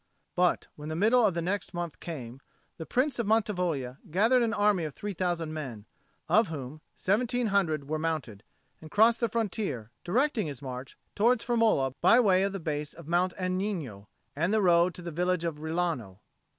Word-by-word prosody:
But 180 -1 +2
when 150 +1 -8
the 155 - -3
middle 225 +7 +4
of 185 - -1
the 170 - -1
next 190 +1 -2
month 175 -2 -4
came, 130 -7 -7 0.4
the 160 - -7
Prince 255 0 0
of 230 - -1
Mantivoglia 180 - 0
gathered 225 +9 +3
an 230 -2 +1
army 205 -4 +2
of 150 -3 -5
three 205 0 -5
thousand 175 -3 -2
men, 125 -9 -6 0.4
of 220 0 +4
whom 150 -1 -7
seventeen 240 +5 +1
hundred 160 -8 +1
were 155 +1 -2
mounted, 155 -11 -3 0.4
and 155 - -10
crossed 225 +5 +4
the 235 - +1
frontier, 200 - -2
directing 235 - +1
his 140 -4 -6
march 130 -1 -7 0.2
towards 230 +3 +2
Firmola 225 - +2
by 235 - +6
way 190 -6 +4
of 195 +1 +1
the 195 - -4
base 150 -2 -3
of 170 -2 -13
Mount 175 +2 +1
Agnino 185 - -3 0.3
and 170 +6 0
the 215 -1 +2
road 175 -1 +4
to 180 - -9
the 170 - -5
village 180 +1 0
of 165 -3 -2
Rilano. 160 - -2
175 Hz, 185 wpm, -29 LUFS, 155-210 Hz, 0.4 s, by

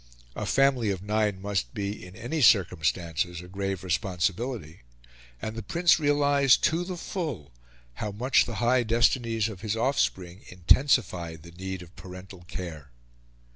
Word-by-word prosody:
A - - -4
family 135 -5 +3
of 95 -2 -3
nine 105 -2 0
must 95 -11 -3
be, 100 0 -4
in 90 0 -11
any 120 +8 -3
circumstances, 85 - +2
a 90 - -10
grave 95 0 -3
responsibility; 95 - -2 0.6
and 110 - -5
the 115 - -4
Prince 170 - +3
realised 145 -2 +3
to 165 +2 +2
the 180 0 -5
full 150 - -5 0.5
how 105 - -2
much 120 +6 +2
the 120 - -6
high 120 +2 +3
destinies 115 -1 +2
of 100 -4 -8
his 110 0 -2
offspring 95 -8 -1
intensified 90 - +2
the 85 - -12
need 95 +1 -6
of 85 +1 -17
parental 90 0 -11
care. 80 -7 -7
100 Hz, 145 wpm, -27 LUFS, 90-125 Hz, 0.6 s, family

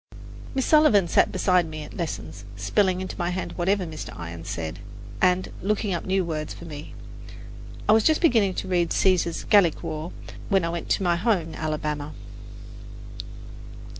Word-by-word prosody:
Miss 265 - +1
Sullivan 300 - +5
sat - - +3
beside 180 -2 +2
me 155 -1 -6
at - - -10
my - - -11
lessons, 105 - -5
spelling 185 - +1
into 185 - -5
my 175 0 0
hand 185 +1 -3
whatever 190 +2 0
Mr. 155 -2 -7
Irons 85 0 -7
said, 80 +1 -4 0.4
and 185 0 +2
looking 210 0 0
up 170 - -3
new 190 -1 +1
words 155 -2 -4
for - - -10
me. 150 -2 -9 0.9
I - - +5
was 220 0 +5
just 315 -1 +4
beginning 225 - +3
to - - -4
read 175 -2 +1
Caesar's 180 -3 +2
"Gallic 195 -7 +4
War" 155 +3 -4 0.4
when 195 -4 +3
I - - -1
went 170 0 -5
to - - +1
my 175 -1 +2
home 180 -4 +1
in - - -9
Alabama. 150 -1 -3
175 Hz, 170 wpm, -25 LUFS, 155-195 Hz, 0.9 s, Sullivan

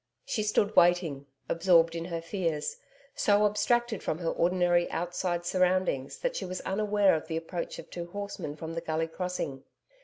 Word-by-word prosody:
She 215 - -1
stood 210 0 +1
waiting, 170 -6 +3 0.2
absorbed 170 -1 +4
in 165 0 -3
her 170 -2 -4
fears, 165 -4 -2 0.4
so 205 0 +3
abstracted 220 +2 +1
from 155 - -2
her 165 -1 -1
ordinary 175 0 +2
outside 175 +1 -2
surroundings 180 -7 +1
that - - -1
she - - -3
was 185 0 -4
unaware 205 0 +2
of 160 0 -2
the 160 -1 -2
approach 170 +1 -4
of - - -9
two 170 -1 -5
horsemen 200 -5 -5
from 160 +1 -6
the 165 - -3
Gully 160 0 -1
Crossing. 165 -6 -4
175 Hz, 165 wpm, -29 LUFS, 165-195 Hz, 0.4 s, absorbed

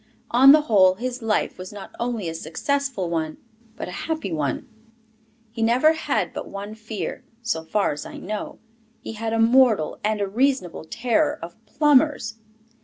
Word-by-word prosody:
On 260 +3 +8
the 305 +1 +7
whole, 190 -9 +4
his 250 +4 -4
life 220 -4 -1
was 185 0 -7
not 205 -2 -9
only 235 -6 -2
a 165 - -3
successful 220 - -2
one, 160 -2 -2 0.4
but - - -6
a - - -6 0.2
happy 315 - -2
one. 150 - -2 0.8
He 225 0 -6
never 250 +8 +4
had 315 - -1
but - - -6
one 200 +2 -6
fear, 220 -1 -6 0.2
so 165 -8 -1
far 200 +5 0
as 150 - -5
I - - -9
know: 210 +2 -5 0.4
he - - -7
had 225 +1 -3
a 225 - 0
mortal 225 -6 +4
and 215 0 0
a 200 - 0
reasonable 235 - 0
terror 290 - +1
of 170 0 -8
plumbers. 275 -4 +2
225 Hz, 170 wpm, -23 LUFS, 185-260 Hz, 0.8 s, On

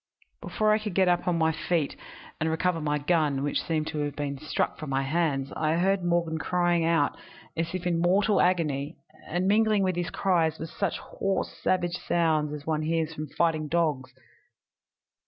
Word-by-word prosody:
"Before 215 -1 +1
I 215 - +3
could 210 -4 -5
get 190 -1 +4
upon 175 0 +2
my 160 0 +3
feet 160 -1 -1 0.4
and 160 - 0
recover 165 +1 0
my 150 -1 0
gun, 150 -3 +1
which 145 - 0
seemed 155 -2 -1
to 155 - -4
have 145 -1 -2
been 140 -2 -3
struck 155 - -2
from 155 - -6
my 135 0 0
hands, 140 -2 0
I 155 0 +1
heard 190 +2 +1
Morgan 170 -2 0
crying 175 -1 +1
out 165 -3 +2 0.4
as 165 +2 -2
if 185 -1 -4
in 170 -2 +1
mortal 195 +4 +3
agony, 155 -4 0 0.3
and 180 +2 -1
mingling 215 0 +3
with 185 -2 +1
his 175 -1 -2
cries 170 -5 +1
were 160 - -5
such 165 - -2
hoarse 195 0 -3
savage 175 -1 0
sounds 155 -3 +1
as 150 -1 -7
one 155 -1 0
hears 160 0 -1
from 155 0 -5
fighting 155 +1 0
dogs. 150 -5 0
165 Hz, 180 wpm, -27 LUFS, 150-180 Hz, 0.4 s, get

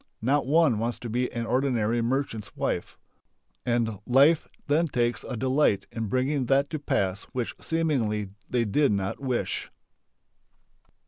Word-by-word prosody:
Not 135 +3 +1
one 150 -6 +4
wants 115 +1 -1
to 120 - -5
be 125 +2 0
an 115 -1 -3
ordinary 120 -3 +1
merchant's 115 -3 -2
wife. - - -2 0.7
And 115 -4 0
life 140 +6 +5 0.2
then 155 +4 +2
takes 120 -4 0 0.2
delight 130 -3 +2
in 115 -1 -3
bringing 130 +3 0
that 140 +2 +2
to 155 - -2
pass 95 -8 -1
which 125 -2 -2
seemingly 125 -11 0 0.2
they 120 -2 +1
did 140 +7 +2
not 100 -1 -1
wish.... 130 -3 -2
125 Hz, 135 wpm, -27 LUFS, 115-140 Hz, 0.7 s, life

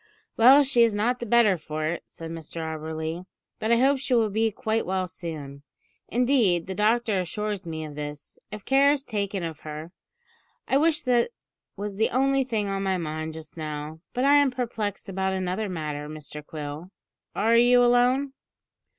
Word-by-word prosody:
"Well, 265 +5 +7
she 260 -3 +3
is 230 -3 +4
not 240 +4 +1
the 235 - -5
better 210 -5 +4
for 155 0 -4
it," 165 +2 -2
said 165 0 -9
Mr 165 0 -7
Auberly; 160 +2 -4 0.3
"but 220 - -1
I 235 - +5
hope 270 +2 +3
she 260 -1 0
will 220 -3 +2
be 220 +2 +2
quite 220 +1 -1
well 185 0 -1
soon. 155 -6 -7 0.5
Indeed, 235 -9 +2
the 190 - -5
doctor 215 0 +2
assures 200 +1 -3
me 160 -1 -4
of 150 - -8
this, 145 0 -8
if 210 -1 -8
care 275 +1 +5
is 285 -1 -1
taken 200 -4 -2
of 160 -2 -5
her. 155 +2 -8 0.8
I 270 - +3
wish 315 +1 +2
that 245 - +2 0.5
was 200 0 -5
the 220 - +2
only 270 +2 +2
thing 220 -5 -2
on 195 0 -2
my 190 -1 0
mind 155 -1 -4
just 155 -1 -10
now; 155 0 -5 0.2
but 250 - 0
I 285 +1 +6
am 285 -1 +4
perplexed 230 -5 -4
about 190 0 -1
another 190 +3 -2
matter, 150 -4 -4
Mr 150 -1 -8
Quill. 150 +2 -7 0.5
Are 225 +3 +3
you 245 +1 +6
alone?" 250 +3 +3
195 Hz, 180 wpm, -26 LUFS, 160-240 Hz, 0.8 s, Well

